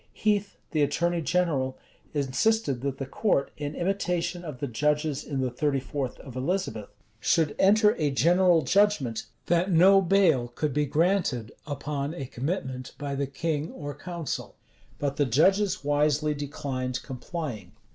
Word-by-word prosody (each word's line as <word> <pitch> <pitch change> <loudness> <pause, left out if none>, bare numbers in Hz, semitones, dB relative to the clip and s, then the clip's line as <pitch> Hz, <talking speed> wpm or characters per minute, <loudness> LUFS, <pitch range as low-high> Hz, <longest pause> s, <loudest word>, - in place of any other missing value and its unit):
[*] - - -36
Heathe, 205 -1 +1 0.2
the 155 - +1
attorney 170 +4 +1
general, 155 -7 0 0.3
insisted 140 - +1
that 135 -1 -2
the 135 - -4
court, 140 - 0
in 145 0 -5
imitation 180 -1 -1
of 150 -6 -6
the 140 - -3
judges 150 +3 0
in 135 -2 -3
the 130 -1 -1
thirty 140 +2 0
fourth 130 0 -4
of 130 -3 -11
Elizabeth,[] 135 - -2 0.3
should 155 +6 +2
enter 210 +2 +5
a 150 -2 +2
general 170 +3 +4
judgment, 160 - +2 0.2
that 175 +2 +2
no 190 +4 +7
bail 170 -9 +3
could 150 -3 -1
be 150 +1 +1
granted 155 - +1 0.2
upon 145 +1 -3
a 135 - -5
commitment 130 -1 -4
by 145 -1 -4
the 140 0 -1
king 150 +2 -2
or 145 -1 -6
council.[] 170 +2 -5 0.4
But 140 -1 -2
the 145 - +3
judges 185 - +3
wisely 150 +1 +2
declined 135 -3 -4
complying. 135 -1 -6
150 Hz, 150 wpm, -27 LUFS, 135-175 Hz, 0.4 s, no